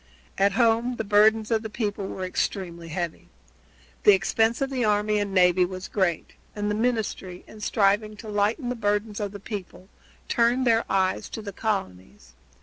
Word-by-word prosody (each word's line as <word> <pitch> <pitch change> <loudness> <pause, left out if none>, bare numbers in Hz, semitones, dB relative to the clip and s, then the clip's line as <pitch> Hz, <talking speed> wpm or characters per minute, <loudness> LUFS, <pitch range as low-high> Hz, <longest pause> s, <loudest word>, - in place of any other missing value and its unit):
At 195 0 +2
home 235 +2 +2
the 225 - -3
burdens 215 +2 +3
of 220 -1 +2
the 220 - -6
people 205 -3 -3
were 190 - -6
extremely 175 -2 -3
heavy. 170 0 -4 0.7
The 205 - +7
expense 225 +4 +1
of 275 0 -1
the 255 -2 -1
army 210 0 +2
and 205 -1 -2
navy 180 -1 +4
was 185 +1 -4
great, 180 -5 -1 0.2
and 205 0 -1
the - - 0
ministry, 215 -5 -2
in 215 - -13
striving 210 0 +1
to 220 - -10
lighten 210 +5 0
the 250 - -2
burdens 210 -1 -1
of 205 -2 -3
the 205 - -8
people, 195 -2 -8 0.4
turned 240 +2 +2
their 230 -1 +3
eyes 190 -1 0
to 220 - -7
the 200 -1 -7
colonies. 95 - -4
205 Hz, 175 wpm, -25 LUFS, 190-225 Hz, 0.7 s, The